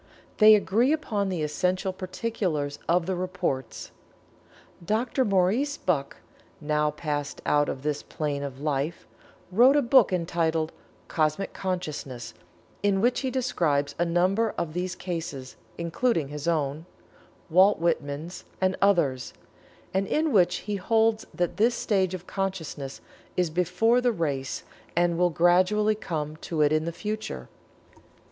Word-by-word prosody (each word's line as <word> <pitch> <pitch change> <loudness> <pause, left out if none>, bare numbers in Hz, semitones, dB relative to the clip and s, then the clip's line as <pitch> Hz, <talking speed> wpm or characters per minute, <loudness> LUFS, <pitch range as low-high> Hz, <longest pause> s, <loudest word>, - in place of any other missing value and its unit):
They 215 0 +9
agree 220 +6 +2
upon 210 -10 -1
the 175 -4 -2
essential 180 +5 0
particulars 185 -7 -3
of 170 0 +3
the 190 +1 -1
reports. 180 -7 -3 0.9
Dr. 230 +7 0
Maurice 215 +8 +1
Bucke, 145 -7 -1 0.4
now 150 0 +1
passed 150 -1 -4
out 145 0 +3
of 130 - -5
this 150 -1 -1
plane 145 -2 -3
of 135 -2 -6
life, 150 +2 -2 0.5
wrote 245 +8 +6
a 290 - +5
book 250 -3 +5
entitled 165 -2 0 0.4
"Cosmic 155 +4 0
Consciousness," 150 -10 -4 0.5
in 200 -1 +2
which 240 +4 +2
he 265 - -1
describes 165 - 0
a - - +4
number 185 +6 +1
of 155 -2 -2
these 180 +1 -2
cases, 160 -8 -5 0.2
including 170 - 0
his 150 +1 -6
own, 155 0 -1 0.6
Walt 190 +5 +6
Whitman's 160 0 -2 0.2
and 185 0 +1
others, 155 -11 +2 0.6
and 190 +1 +1
in 310 0 +1
which 180 -4 +4
he 210 -1 -2
holds 225 +2 +2
that 175 0 -2
this 235 +3 +3
stage 190 -5 0
of 180 0 -9
consciousness 170 -9 -4 0.4
is 180 -3 +1
before 180 +8 +2
the 245 -1 +3
race 140 - -2 0.3
and 170 0 +2
will 180 0 +4
gradually 185 +6 +3
come 155 -7 -4
to 160 -1 -1
it 145 - +3
in 155 +1 +1
the 170 - -2
future. 210 - -5
175 Hz, 140 wpm, -26 LUFS, 150-205 Hz, 0.9 s, They